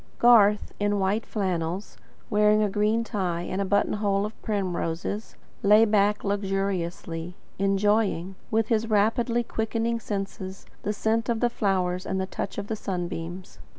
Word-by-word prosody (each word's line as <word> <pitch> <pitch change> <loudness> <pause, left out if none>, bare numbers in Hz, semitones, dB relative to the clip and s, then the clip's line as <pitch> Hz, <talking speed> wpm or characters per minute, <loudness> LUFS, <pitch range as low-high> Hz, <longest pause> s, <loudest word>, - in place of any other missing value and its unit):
Garth, 210 -4 +5
in 205 0 +1
white 200 +4 0
flannels, 185 -2 -2 0.3
wearing 210 0 +4
a 205 - 0
green 210 +3 +2
tie 180 -6 -2
and 185 +2 -2
a - - 0
button 200 +1 +2
hole 200 -1 +1
of 215 - -8
primroses, 190 0 -2 0.3
lay 210 +2 +6
back 210 -1 +2
luxuriously, 190 -4 -2 0.2
enjoying, 195 -2 +1 0.2
with 220 -1 +1
his 225 0 +1
rapidly 230 +3 +2
quickening 230 +1 -1
senses, 195 -3 -5 0.2
the 210 - -1
scent 220 +2 0
of 230 -1 +1
the 240 0 +2
flowers 185 -4 0
and 190 - -1
the 190 - 0
touch 195 - -5
of 205 - -3
the 220 - -3
sun 180 -4 -3
beams. 170 - -7
205 Hz, 150 wpm, -26 LUFS, 190-215 Hz, 0.3 s, lay